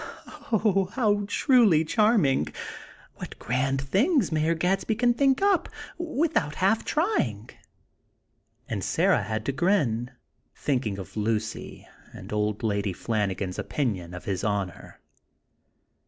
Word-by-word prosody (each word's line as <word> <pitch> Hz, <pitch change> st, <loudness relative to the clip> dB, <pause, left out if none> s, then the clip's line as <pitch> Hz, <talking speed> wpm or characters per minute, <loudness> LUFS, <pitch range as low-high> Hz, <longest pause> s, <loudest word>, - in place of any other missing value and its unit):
Oh! 195 Hz, -4 st, +2 dB
how 205 Hz, -5 st, +1 dB
truly 210 Hz, -, +4 dB
charming! 190 Hz, -, +3 dB, 0.7 s
What -, -, -8 dB
grand 135 Hz, +3 st, -1 dB
things 210 Hz, -, +2 dB
Mayor 160 Hz, +1 st, +1 dB
Gadsby 190 Hz, +6 st, 0 dB
can 240 Hz, +2 st, +3 dB
think 270 Hz, +6 st, +2 dB
up 400 Hz, -3 st, +2 dB, 0.3 s
without 315 Hz, -, 0 dB
half 200 Hz, +4 st, +2 dB
trying!" 130 Hz, -, -1 dB, 1.2 s
And -, -, -3 dB
Sarah -, -, +2 dB
had 110 Hz, +2 st, -3 dB
to -, -, 0 dB
grin, 135 Hz, -, +1 dB, 0.5 s
thinking 125 Hz, -8 st, -1 dB
of 95 Hz, 0 st, -9 dB
Lucy, 110 Hz, 0 st, -3 dB, 0.3 s
and -, -, -9 dB
Old 105 Hz, +1 st, -1 dB
Lady 100 Hz, -3 st, 0 dB
Flanagan's 100 Hz, -3 st, -2 dB
opinion 95 Hz, -, -2 dB
of 90 Hz, -, -9 dB
His 95 Hz, -2 st, -2 dB
Honor! 100 Hz, -3 st, -3 dB
145 Hz, 115 wpm, -26 LUFS, -, 1.2 s, truly